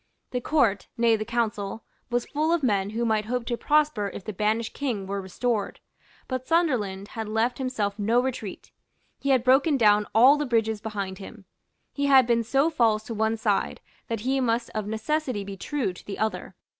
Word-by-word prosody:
The 250 - -2
Court, 230 -9 +1
nay, 230 -1 +4
the 215 - -2
Council, 225 -2 -2 0.3
was 240 0 0
full 310 +2 -1
of 340 -3 +1
men 200 -5 +1
who 230 +3 -2
might 215 -2 +1
hope 245 +1 -2
to 240 - -1
prosper 295 -7 +1
if - - -7
the 215 - -5
banished 215 +3 0
King 240 -9 -3
were 200 +1 -3
restored. 210 +3 -2 0.5
But 255 -1 -4
Sunderland 220 - 0
had 220 -2 -5
left 225 +5 0
himself 220 -6 -2
no 225 +4 +3
retreat. 245 -6 -4 0.5
He 280 - -2
had 260 -3 +4
broken 270 +4 +4
down 210 -3 +4
all 260 +6 +7
the 295 -1 -2
bridges 225 -3 0
behind 200 -3 -4
him. 200 +1 -11 0.5
He 280 0 0
had 265 -2 +7
been 235 -1 +2
so 275 +7 +2
false 225 -7 +2
to 230 - -6
one 220 +1 0
side 210 -2 0 0.3
that 225 -2 -3
he 265 +3 0
must 235 -2 0
of 215 -1 -3
necessity 220 +1 -2
be 200 0 -7
true 235 0 -2
to - - -13
the 200 - -6
other. 195 -4 -3
230 Hz, 195 wpm, -26 LUFS, 210-255 Hz, 0.5 s, all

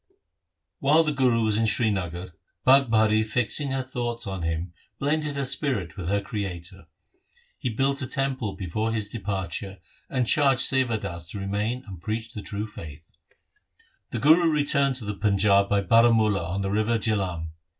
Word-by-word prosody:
While 150 +4 +4
the 155 - 0
Guru 125 -5 +2
was 110 -1 +1
in 115 0 +2
Srinagar, 95 -6 -1 0.4
Bhagbhari 110 -5 +4
fixing 120 +6 0
her 135 0 -1
thoughts 120 -2 -4
on 95 -3 -4
him 80 +2 -3 0.2
blended 150 +1 -1
her 140 -1 -1
spirit 125 - -1
with 90 -4 -6
her 100 +2 +1
Creator. 95 -3 -6 0.7
He 125 - -2
built 135 +5 0
a 130 - -2
temple 135 -7 -2
before 110 +5 -2
his 105 -2 -2
depar 95 -5 -3
ture, 100 -1 -6 0.3
and 130 -1 0
charged 135 0 +4
Sewa 130 -4 +3
Das 85 -5 -7
to 100 - -5
remain 105 +6 -2
and 95 -6 -10
preach 110 +3 -4
the 105 - -6
true 105 +1 -4
faith. 80 -7 -11 1.0
The - - -4
Guru 165 +4 +5
returned 140 -2 +2
to 120 -4 -3
the 105 - -3
Panjab 100 -1 +3
by 100 -1 +2
Baramula 110 -4 +3
on 100 +2 -2
the 95 - -2
river 110 +3 +1
Jihlam. 95 -7 -1
110 Hz, 165 wpm, -25 LUFS, 95-130 Hz, 1.0 s, Guru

